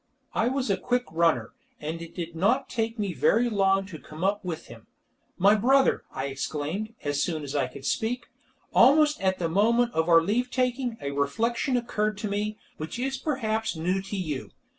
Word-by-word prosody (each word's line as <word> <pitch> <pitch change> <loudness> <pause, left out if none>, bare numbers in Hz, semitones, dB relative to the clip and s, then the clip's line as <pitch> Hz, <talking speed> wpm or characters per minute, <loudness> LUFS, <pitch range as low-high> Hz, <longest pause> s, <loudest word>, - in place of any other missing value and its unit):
I 225 - +2
was 260 -3 0
a 195 - +2
quick 245 0 0
runner, 160 -9 +2 0.3
and 160 +2 -4
it 170 - -10
did 170 -1 -5
not 225 +11 +2
take 230 0 -1
me 200 -4 -2
very 230 +8 +3
long 195 -1 +2
to 175 -5 -9
come 155 +5 -9
up 205 +2 +1
with 175 -4 -5
him. 115 -1 -13 0.5
"My 200 +3 +6
brother," 265 +6 +3
I 135 - -3
exclaimed, 155 +10 -3
as 145 0 0
soon 160 -4 -1
as 140 0 -5
I 135 -3 +1
could 130 +1 -11
speak, 230 - -1 0.5
"almost 295 +3 +5
at 190 -1 +1
the 170 - -1
moment 235 +7 +2
of 160 +1 +1
our 165 -1 +7
leave 235 +7 0
taking, 250 -2 -1
a 140 - -3
reflection 230 - 0
occurred 215 -3 -1
to 210 - -3
me, 210 +1 -2 0.2
which 155 +7 -5
is 265 +2 -1
perhaps 220 - -1
new 180 +4 0
to 195 +1 -5
you. 155 -8 -3
200 Hz, 190 wpm, -27 LUFS, 160-235 Hz, 0.5 s, our